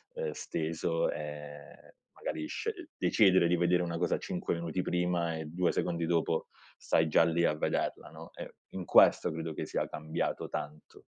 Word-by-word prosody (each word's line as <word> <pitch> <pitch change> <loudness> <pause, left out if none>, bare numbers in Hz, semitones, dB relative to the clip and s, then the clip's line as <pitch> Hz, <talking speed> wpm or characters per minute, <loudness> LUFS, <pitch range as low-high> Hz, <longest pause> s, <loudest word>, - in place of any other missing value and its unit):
ehm, 485 -1 -2
steso, 80 +1 -1
e 75 -1 -9 0.2
magari 80 - -4
sce 375 -8 -5
decidere 95 -5 +4
di 90 - +3
vedere 90 +1 +3
una 85 -1 -3
cosa 90 - +1
5 - - -3
minuti 85 +2 -2
prima 90 -2 0
e 80 - -5
2 85 +4 0
secondi 85 -1 -1
dopo 80 -1 0 0.3
stai 80 - +2
già 80 +1 +5
lì 85 +1 +2
a 75 - +2
vederla, 75 - -1
no, - - -11
e - - -8 0.2
in 95 - -5
questo - - +6
credo 80 0 -4
che - - -4
sia - - -2
cambiato 80 +1 -3
tanto. 75 +1 -7
85 Hz, 165 wpm, -31 LUFS, 80-90 Hz, 0.3 s, questo